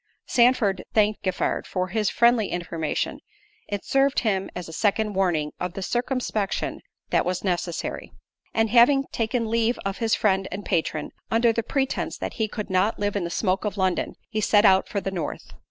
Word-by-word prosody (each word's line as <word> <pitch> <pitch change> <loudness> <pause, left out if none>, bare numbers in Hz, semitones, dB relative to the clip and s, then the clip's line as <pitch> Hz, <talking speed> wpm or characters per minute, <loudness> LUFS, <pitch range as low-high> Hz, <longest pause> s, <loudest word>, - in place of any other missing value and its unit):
Sandford 235 -6 +3
thanked 215 -1 +3
Giffard 185 - -1
for 185 -1 -2
his 210 +2 0
friendly 235 -3 +3
information. 165 -3 -3 0.5
It 205 -2 -4
served 275 0 +2
him 195 -4 0
as 180 -2 -5
a 160 - -9
second 210 +3 +1
warning 175 -6 +1
of 180 -1 -3
the 195 - -5
circumspection 240 -3 -2 0.3
that - - +3
was 180 0 -2
necessary; 175 -3 -3 0.4
and 225 -1 +1
having 250 +4 +6
taken 230 0 -1
leave 230 +1 +1
of 195 0 -3
his 225 -2 +2
friend 195 -2 +1
and 195 +2 -5
patron, 155 -2 -1 0.2
under 230 0 +3
the 230 - 0
pretence 270 +3 -2
that - - -4
"He 220 - +2
could 210 -2 -6
not 190 +4 +2
live 205 0 -1
in 195 -4 -1
the - - -3
smoke 185 +2 0
of 210 -2 -3
London," 185 -2 0
he 215 -2 -2
set 210 +1 +4
out 190 -1 +5
for 200 - -2
the 195 - -3
North. 170 -6 -5
205 Hz, 185 wpm, -25 LUFS, 185-225 Hz, 0.5 s, having